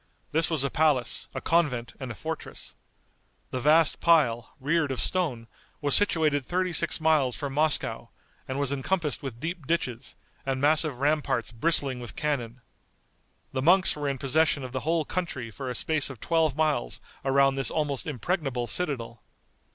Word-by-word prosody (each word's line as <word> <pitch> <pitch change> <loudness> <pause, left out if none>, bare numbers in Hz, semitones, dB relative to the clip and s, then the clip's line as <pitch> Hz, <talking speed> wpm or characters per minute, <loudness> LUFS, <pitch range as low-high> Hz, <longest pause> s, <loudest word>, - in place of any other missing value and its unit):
This 160 0 +2
was 160 -5 +1
a 140 - -1
palace, 150 -6 +2
a - - -3
convent 145 -9 0
and 130 -2 -6
a - - -7
fortress. 160 +7 -6 0.8
The 130 - -3
vast 155 +3 +4
pile, 135 -9 +2
reared 150 +2 +1
of 130 - -3
stone, 150 -11 -1 0.3
was 145 -2 +5
situated 155 -8 +3
thirty 180 +5 -1
six 170 +1 +1
miles 155 -6 +2
from 140 -2 -5
Moscow, 155 +1 +1 0.4
and 130 - -4
was 140 -1 +1
encompassed 150 0 -1
with 130 -4 -7
deep 165 -1 -5
ditches, 125 -8 -2 0.3
and 135 -1 -2
massive 150 -1 +3
ramparts 140 -4 0
bristling 135 +1 +1
with 120 -2 -7
cannon. 125 -5 -3 0.9
The 130 - -2
monks 185 +6 +4
were 145 -1 -2
in 135 - -2
possession 140 +1 +2
of 130 - -6
the 130 - -2
whole 160 +2 0
country 140 -11 -4
for 130 +4 -6
a 125 - -4
space 155 +3 +1
of 130 -4 -9
twelve 160 -1 +1
miles 150 - 0 0.2
around 135 0 +3
this 135 0 +2
almost 145 -4 -2
impregnable 135 - -2
citadel. 120 -7 -2
145 Hz, 165 wpm, -27 LUFS, 130-160 Hz, 0.9 s, was